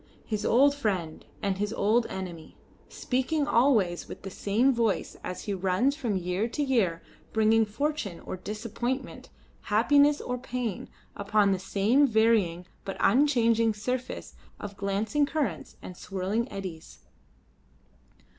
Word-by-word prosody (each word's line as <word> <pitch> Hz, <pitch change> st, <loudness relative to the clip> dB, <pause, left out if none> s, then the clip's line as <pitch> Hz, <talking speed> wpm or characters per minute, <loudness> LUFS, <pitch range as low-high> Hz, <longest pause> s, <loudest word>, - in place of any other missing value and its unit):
His 215 Hz, -2 st, -2 dB
old 280 Hz, +4 st, +5 dB
friend 190 Hz, -, -2 dB, 0.2 s
and 195 Hz, -1 st, -1 dB
his 205 Hz, 0 st, -1 dB
old 225 Hz, +2 st, +2 dB
enemy, 175 Hz, -4 st, -7 dB, 0.3 s
speaking 275 Hz, +4 st, -1 dB
always 230 Hz, -10 st, +2 dB
with -, -, -10 dB
the 195 Hz, -, -6 dB
same 225 Hz, +8 st, +2 dB
voice 230 Hz, -4 st, 0 dB
as 180 Hz, -, -5 dB
he 205 Hz, -, -2 dB
runs 195 Hz, +9 st, +1 dB
from 235 Hz, -10 st, -1 dB
year 180 Hz, +4 st, -1 dB
to 290 Hz, +5 st, -2 dB
year 215 Hz, -12 st, +1 dB, 0.3 s
bringing 220 Hz, 0 st, +4 dB
fortune 230 Hz, -, -3 dB
or -, -, -6 dB
disappointment 230 Hz, +7 st, -4 dB, 0.4 s
happiness 285 Hz, +7 st, +4 dB
or 250 Hz, 0 st, -4 dB
pain, 245 Hz, -5 st, -4 dB, 0.3 s
upon 205 Hz, 0 st, +2 dB
the 190 Hz, -, 0 dB
same 215 Hz, +9 st, +3 dB
varying 220 Hz, -7 st, +2 dB, 0.2 s
but 195 Hz, -, -5 dB
unchanged 230 Hz, -5 st, +3 dB
surface 250 Hz, +4 st, -4 dB, 0.3 s
of 205 Hz, -1 st, -7 dB
glancing 205 Hz, +9 st, 0 dB
currents 305 Hz, -2 st, -3 dB
and 180 Hz, -, -8 dB
swirling 195 Hz, +6 st, -3 dB
eddies. 185 Hz, -5 st, -8 dB
220 Hz, 130 wpm, -28 LUFS, 195-250 Hz, 0.4 s, old